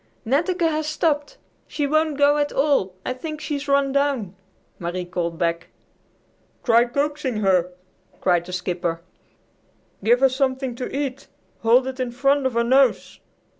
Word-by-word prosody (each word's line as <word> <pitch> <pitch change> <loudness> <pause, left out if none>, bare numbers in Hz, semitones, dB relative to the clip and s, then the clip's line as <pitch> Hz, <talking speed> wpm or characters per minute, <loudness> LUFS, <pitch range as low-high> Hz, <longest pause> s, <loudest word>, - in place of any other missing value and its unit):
"Netteke 335 - +1
has 310 -1 -1
stopped. 305 -1 -1 0.3
She 295 - -2
won't 310 0 +1
go 290 +1 +4
at 290 0 0
all. 270 -10 +1
I - - -1
think 305 +4 -6
she's 290 -2 -4
run 280 -1 +2
down!" 270 -9 0 0.4
Marie 175 +1 -3
called 170 -1 -3
back. 170 0 -1 1.0
"Try 235 0 +5
coaxing 280 -2 -2
her," 185 -3 +2 0.5
cried 175 -1 +1
the - - -7
skipper. 175 -2 -2 1.0
"Give 240 +4 +4
her 270 - +6
something 260 -1 -1
to 245 +2 -5
eat. 275 -1 -4 0.3
Hold 240 +3 +4
it 260 0 -5
in 255 -1 -1
front 275 +2 +2
of 260 - -4
her 235 0 +2
nose." 260 +1 +2
260 Hz, 150 wpm, -22 LUFS, 205-285 Hz, 1.0 s, her